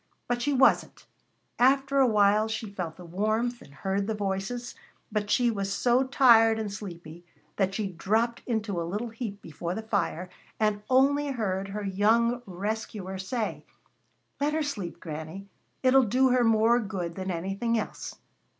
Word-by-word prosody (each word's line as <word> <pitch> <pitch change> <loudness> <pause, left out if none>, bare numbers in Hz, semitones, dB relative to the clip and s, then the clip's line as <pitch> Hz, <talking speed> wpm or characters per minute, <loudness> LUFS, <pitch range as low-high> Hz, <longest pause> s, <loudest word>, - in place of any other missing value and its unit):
But 240 0 -1
she 290 +4 +1
wasn't. 270 -1 +3 0.5
After 270 +2 +3
a 265 - +6
while 210 0 +4
she 220 0 -4
felt 175 -5 -4
the 180 - -12
warmth 215 +7 -1
and - - -15
heard 195 +6 -2
the 220 - -1
voices, 205 +5 -3 0.4
but 210 -1 -2
she 240 0 +3
was 200 -2 -3
so 245 +5 +2
tired 230 -4 +5
and 215 -2 -3
sleepy 175 -5 -9 0.3
that 195 -1 +1
she 215 - -1
dropped 220 +6 0
into 215 -7 -1
a - - -1
little 205 +8 -3
heap 220 -3 -6
before 170 +3 -5
the 220 - -4
fire 200 -5 -1 0.3
and 210 -1 +1
only 280 +3 +3
heard 195 -8 -2
her 205 +1 -5
young 225 +5 +2
rescuer 195 0 -4
say: 215 +4 -3 0.8
"Let 290 +1 +1
her 315 0 +1
sleep, 205 - -5
Granny; 160 +5 -7 0.4
it'll 260 +1 +6
do 255 +5 +3
her 250 -1 +3
more 225 +1 +4
good 190 -6 -4
than 190 +1 -5
anything 195 +7 -1
else." 220 - -5
215 Hz, 160 wpm, -27 LUFS, 195-240 Hz, 0.8 s, a